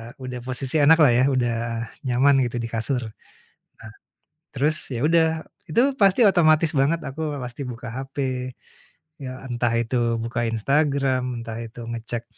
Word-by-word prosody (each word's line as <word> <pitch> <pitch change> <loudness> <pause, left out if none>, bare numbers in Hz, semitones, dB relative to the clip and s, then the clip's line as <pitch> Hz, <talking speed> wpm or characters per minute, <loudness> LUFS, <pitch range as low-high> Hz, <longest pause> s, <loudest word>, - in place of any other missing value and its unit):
udah 125 -2 -7
posisi 130 +4 -1
enaklah 150 -2 +6
ya, 125 +2 +3
udah 120 -4 +1 0.5
nyaman 135 +3 +4
gitu 120 - -7
di 115 -1 -4
kasur. 120 +2 -1
Nah, 110 - -7 1.4
terus 150 +4 0
ya 120 - -3
udah 160 +1 +2 0.2
itu 165 +10 +2 0.2
pasti 200 +3 +4
otomatis 160 -3 +4
banget, 155 +5 +2
aku 150 +2 -6 0.2
pasti 125 +3 -7
buka 120 -1 -7
HP, 135 +3 -7 1.0
ya 130 -1 -7
entah 120 -2 -1
itu 115 0 0
buka 115 0 -2
Instagram, 130 0 0
entah 115 -1 -6
itu 115 +1 -10
ngecek 115 0 -5
130 Hz, 140 wpm, -23 LUFS, 120-145 Hz, 1.4 s, enaklah